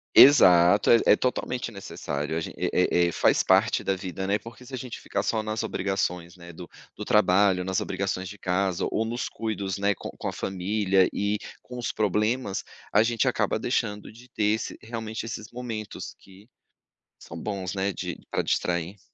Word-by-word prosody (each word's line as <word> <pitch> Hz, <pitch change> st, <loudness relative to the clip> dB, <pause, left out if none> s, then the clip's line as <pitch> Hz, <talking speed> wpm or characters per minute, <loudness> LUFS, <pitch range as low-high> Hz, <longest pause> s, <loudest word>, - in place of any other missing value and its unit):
Exato, 90 Hz, -8 st, +7 dB
é 115 Hz, -, +7 dB
é -, -, +7 dB
totalmente 125 Hz, 0 st, -2 dB
necessário. 75 Hz, -7 st, -4 dB
A -, -, 0 dB
gente 80 Hz, -, -6 dB
eh -, -, 0 dB, 0.2 s
eh 90 Hz, 0 st, +4 dB
eh, -, -, -1 dB
faz -, -, +3 dB
parte -, -, +3 dB
da 95 Hz, -, 0 dB
vida, 95 Hz, 0 st, -5 dB
né? 100 Hz, +2 st, +1 dB
Porque 115 Hz, +4 st, -12 dB
se 130 Hz, -, -13 dB
a -, -, -2 dB
gente 125 Hz, -1 st, -7 dB
ficar -, -, -2 dB
só 110 Hz, -1 st, 0 dB
nas 110 Hz, 0 st, -2 dB
obrigações, 90 Hz, -3 st, -2 dB
né, 85 Hz, -1 st, -12 dB
do 85 Hz, +1 st, -10 dB, 0.3 s
do -, -, -6 dB
trabalho, 95 Hz, -2 st, +4 dB
nas 95 Hz, 0 st, -1 dB
obrigações 95 Hz, -1 st, -2 dB
de 105 Hz, -, -10 dB
casa 95 Hz, -1 st, 0 dB
ou 110 Hz, -, 0 dB
nos 120 Hz, +2 st, -3 dB
cuidados, 100 Hz, -4 st, -3 dB
né, 100 Hz, +1 st, +2 dB
com -, -, -7 dB
com -, -, -4 dB
a -, -, -3 dB
família 95 Hz, 0 st, +1 dB
e 100 Hz, +1 st, 0 dB, 0.2 s
com 125 Hz, -, -10 dB
os 120 Hz, -, -2 dB
problemas, 105 Hz, +1 st, 0 dB, 0.3 s
a 105 Hz, -, +5 dB
gente 115 Hz, -1 st, +1 dB
acaba -, -, +1 dB
deixando 105 Hz, 0 st, -2 dB
de 120 Hz, +3 st, -16 dB
ter 110 Hz, -, -3 dB
esse 110 Hz, -, -5 dB
realmente, 110 Hz, -1 st, -5 dB
esses 110 Hz, -1 st, -7 dB
momentos 115 Hz, -4 st, -6 dB
que 95 Hz, +2 st, -18 dB, 0.7 s
são 80 Hz, -, -9 dB
bons, 95 Hz, -3 st, -4 dB
né, 95 Hz, +1 st, 0 dB
de -, -, -5 dB
pra -, -, 0 dB
distrair. 90 Hz, +3 st, -1 dB
100 Hz, 190 wpm, -26 LUFS, 95-110 Hz, 0.7 s, Exato